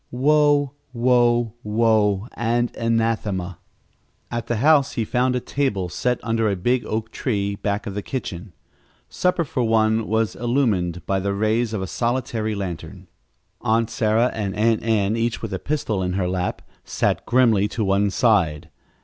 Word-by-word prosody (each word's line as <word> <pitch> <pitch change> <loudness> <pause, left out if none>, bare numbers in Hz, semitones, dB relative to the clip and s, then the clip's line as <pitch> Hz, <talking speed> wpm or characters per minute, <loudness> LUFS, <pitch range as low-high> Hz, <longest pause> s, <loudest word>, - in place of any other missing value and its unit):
Woe, 145 +1 +3 0.2
woe, 120 -2 +2
woe 105 -2 +2
and 120 +1 -1
anathema! 110 -6 -1 0.7
At 120 -1 -3
the 120 - 0
house 140 +3 +4
he 115 - -1
found 125 +3 +1
a - - +1
table 110 -9 -2
set 125 +7 -1
under 115 -1 +1
a 100 - 0
big 120 +7 0
oak 110 +1 -3
tree 100 -5 -1
back 100 +1 -2
of 100 - -5
the 105 - -3
kitchen. 100 -6 -5 0.6
Supper 180 -1 +1
for 130 - -2
one 110 -1 +2
was 110 -2 0
illumined 110 -9 0
by 95 0 0
the 100 +1 -1
rays 110 +3 +1
of 105 -4 -2
a - - -2
solitary 115 0 -2
lantern. 90 -5 -6 0.5
Aunt 115 +1 +1
Sarah 110 +2 +2
and 100 -4 -3
Aunt 110 +1 +2
Ann, 110 -2 +1
each 115 0 -2
with 110 -3 -4
a 95 - -2
pistol 120 -8 -2
in 90 0 -1
her 95 -1 0
lap, 90 0 -2 0.2
sat - - -1
grimly 115 -5 +3
to 110 +1 -3
one 100 +1 +2
side. 95 - +1
110 Hz, 160 wpm, -22 LUFS, 100-120 Hz, 0.7 s, house